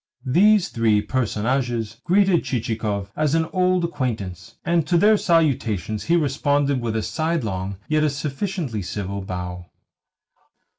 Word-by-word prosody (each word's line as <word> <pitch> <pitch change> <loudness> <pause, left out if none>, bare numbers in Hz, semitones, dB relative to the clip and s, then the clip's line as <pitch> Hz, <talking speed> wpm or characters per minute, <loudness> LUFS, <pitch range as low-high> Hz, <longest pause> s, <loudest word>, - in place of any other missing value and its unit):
These 195 +8 +4
three 110 -2 +2
personages 120 -1 -1
greeted 190 -1 +3
Chichikov 110 -5 -2
as 155 0 +1
an 165 0 +2
old 185 -1 +2
acquaintance, 105 - -4
and 170 -2 +1
to 175 - +3
their 210 +5 +5
salutations 125 - +1
he 170 - +3
responded 145 -3 +1
with 115 -2 -2
a 110 - 0
sidelong, 105 - -2
yet 155 0 +2
a 155 - +3
sufficiently 145 - -3
civil, 100 +1 -4
bow. 90 -1 -6
130 Hz, 130 wpm, -22 LUFS, 105-165 Hz, -, their